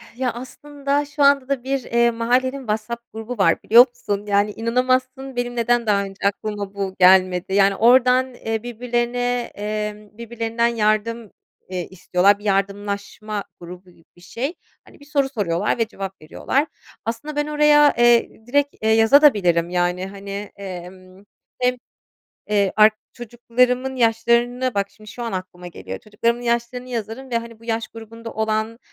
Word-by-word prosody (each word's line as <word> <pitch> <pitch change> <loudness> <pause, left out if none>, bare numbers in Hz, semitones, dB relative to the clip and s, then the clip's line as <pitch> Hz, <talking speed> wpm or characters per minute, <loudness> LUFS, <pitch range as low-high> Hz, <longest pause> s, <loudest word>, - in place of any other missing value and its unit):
Ya, 250 -1 -1
aslında 280 +3 -3
şu 290 0 -1
anda 280 -2 +4
da 270 -3 -1
bir 270 -1 -2
eee, 235 0 +2
mahallenin 250 +4 0
WhatsApp 235 0 -5
grubu 225 +2 -6
var 180 -4 +2
biliyor 240 +3 +8
musun? 205 -4 -4
Yani 205 +1 +2
inanamazsın, 255 +3 -1
benim 245 0 -3
neden 240 0 +1
daha 200 -1 +2
önce 195 0 -3
aklıma 205 0 -4
bu 195 -1 -4
gelmedi? 185 0 +4
Yani, 195 0 +4
oradan 250 +3 +4
eee, 225 -2 -4
birbirlerine 245 +1 -2
eee, 210 0 -4
birbirlerinden 230 +1 -2
yardım 225 0 0 0.4
eee, 180 -2 -4
istiyorlar, 190 +2 +2
bir - - -16
yardımlaşma 200 +1 -2 0.2
grubu 180 +1 -11
gibi 165 - -24
bir 175 - -20
şey. 260 - -4 0.3
Hani, - - -19
bir 285 - -16
soru 280 -2 0
soruyorlar 205 -6 -1
ve 230 -2 0
cevap 195 -4 -7
veriyorlar. 270 - -1 0.4
Aslında 235 +7 -4
ben 295 0 -1
oraya, 295 -1 +5
eee, 240 -2 +3
direkt, 285 +2 +1
eee, 220 - +1
yazabilirim 220 - +4
de, 180 - -9
yani, 180 +1 0
hani, 200 +1 -7
emm, 185 0 -10 0.4
hem, 250 0 +2 0.8
eee, 200 -2 +2
ark 215 0 +6 0.2
çocuklarımın 250 +2 0
yaşlarını 235 +2 +1
bak 200 0 -1
şimdi, 215 -1 -14
şu 240 - -8
an 230 - -4
aklıma 185 -1 -6
geliyor, 95 - -8
çocuklarımın 230 +3 -1
yaşlarını 235 +1 -2
yazarım 240 +2 -5
ve, 235 - +1
hani, 230 -1 -11
bu - - -17
yaş 225 -1 -2
grubunda 230 0 -10
olan 220 +1 -1
230 Hz, 155 wpm, -21 LUFS, 200-245 Hz, 0.8 s, biliyor